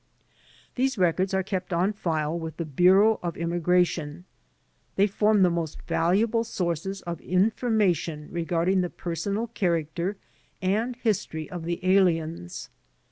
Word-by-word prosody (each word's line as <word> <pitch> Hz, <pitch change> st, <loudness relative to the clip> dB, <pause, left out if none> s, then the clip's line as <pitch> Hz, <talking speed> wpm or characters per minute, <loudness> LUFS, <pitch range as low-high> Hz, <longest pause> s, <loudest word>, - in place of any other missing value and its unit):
These 260 Hz, -1 st, 0 dB
records 185 Hz, +1 st, +2 dB
are 190 Hz, -, +1 dB
kept 185 Hz, -2 st, -4 dB
on 180 Hz, +4 st, +1 dB
file 160 Hz, -5 st, -1 dB
with 160 Hz, -1 st, -6 dB
the 170 Hz, -, -3 dB
Bureau 185 Hz, +8 st, +4 dB
of 170 Hz, -2 st, -4 dB
Im 170 Hz, 0 st, -2 dB
migration. 175 Hz, -2 st, +1 dB, 0.7 s
They 195 Hz, -, +4 dB
form 210 Hz, 0 st, +3 dB
the 180 Hz, -, +4 dB
most 165 Hz, -3 st, -3 dB
valuable 210 Hz, +7 st, +1 dB
sources 190 Hz, -3 st, -3 dB
of 170 Hz, -2 st, -5 dB
in 185 Hz, +5 st, +2 dB
formation 180 Hz, -10 st, 0 dB
regarding 175 Hz, +2 st, +1 dB
the 180 Hz, -, -2 dB
personal 200 Hz, +7 st, -3 dB
character 175 Hz, -3 st, -1 dB, 0.4 s
and 215 Hz, +6 st, 0 dB
history 200 Hz, -9 st, -2 dB
of 175 Hz, -2 st, -6 dB
the 170 Hz, +1 st, -2 dB
aliens. 165 Hz, -, +1 dB
180 Hz, 135 wpm, -26 LUFS, 165-200 Hz, 0.7 s, Bureau